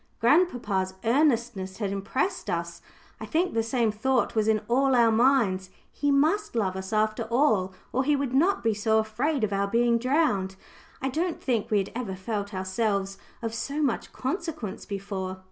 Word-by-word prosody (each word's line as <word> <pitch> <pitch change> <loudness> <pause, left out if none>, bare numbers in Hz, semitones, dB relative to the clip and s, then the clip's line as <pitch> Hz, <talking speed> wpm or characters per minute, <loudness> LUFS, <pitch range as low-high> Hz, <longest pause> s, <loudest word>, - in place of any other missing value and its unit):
Grandpapa's 230 - +2
earnestness 235 -7 +1
had 205 -3 -2
impressed 260 - -2
us. - - -3 0.4
I - - -7
think 345 +3 0
the 225 - +2
same 230 -1 +1
thought 245 +4 0
was 220 -1 +1
in 215 -1 +2
all 265 +3 +3
our 235 -2 +5
minds: 220 -6 +2 0.2
"He 290 - -1
must 315 - +2
love 195 -5 0
us, 190 0 -6
after 215 +1 +1
all, 225 -6 +2 0.2
or 260 - +2
he 295 +2 +2
would 275 -3 -2
not 345 +9 +2
be 225 -1 +2
so 220 +1 +1
afraid 235 +6 0
of 210 -1 0
our 200 0 +1
being 235 +2 +2
drowned." 235 -8 +1 0.5
I 265 - +1
don't 330 +5 -2
think 235 -5 -1
we 215 - +2
had 195 -1 -1
ever 230 -6 -4
felt 205 +1 -4
ourselves 195 0 -1 0.2
of 225 -1 -2
so 285 +6 -2
much 265 -5 -1
consequence 290 - -4
before. 195 -2 -4
230 Hz, 175 wpm, -27 LUFS, 200-270 Hz, 0.5 s, our